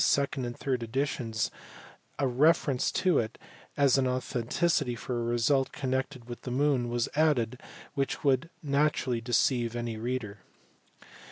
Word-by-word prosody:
second 140 -2 +1
and 120 0 -5
third 130 -3 -1
editions 115 -2 -1 0.7
a 140 - +1
reference 135 0 +3
to 180 -5 +2
it 110 0 -3 0.4
as 140 -2 +4
an 130 - +2
authority 125 +3 0
for 120 +1 -3
a - - -1
result 120 +3 +2
connected 130 -2 -3
with 120 -1 -7
the - - -6
moon 130 -2 +1
was 120 -1 0
added 130 -6 +2 0.3
which 140 -2 -2
would 140 +3 +2
naturally 140 -4 +1
deceive 120 0 +1
any 120 -2 -3
reader. 110 -3 -3
130 Hz, 140 wpm, -29 LUFS, 120-140 Hz, 0.7 s, as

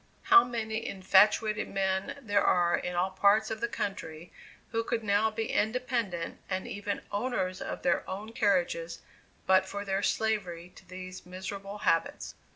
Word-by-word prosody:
How 390 0 +8
many 225 -2 -3
infatuated 210 +3 +3
men 190 +3 -1
there 205 -3 +2
are 175 -1 +3
in 180 - -4
all 180 +2 +1
parts 205 +4 +3
of 220 0 -4
the 235 - +1
country, 180 -7 -5 0.4
who 230 -1 0
could 230 -1 -2
now 205 +1 +3
be 220 +1 -3
independent, 220 -6 -1
and 185 0 -2
even 205 0 -4
owners 200 -4 -2
of - - -5
their 175 0 +1
own 205 +4 -5
carriages, 180 -6 0 0.4
but 190 0 +4
for 200 +1 -5
their 195 0 0
slavery 190 -6 -1
to 185 - -16
these 185 0 -8
miserable 195 +2 -6
habits! 165 -5 0
200 Hz, 155 wpm, -30 LUFS, 185-220 Hz, 0.4 s, How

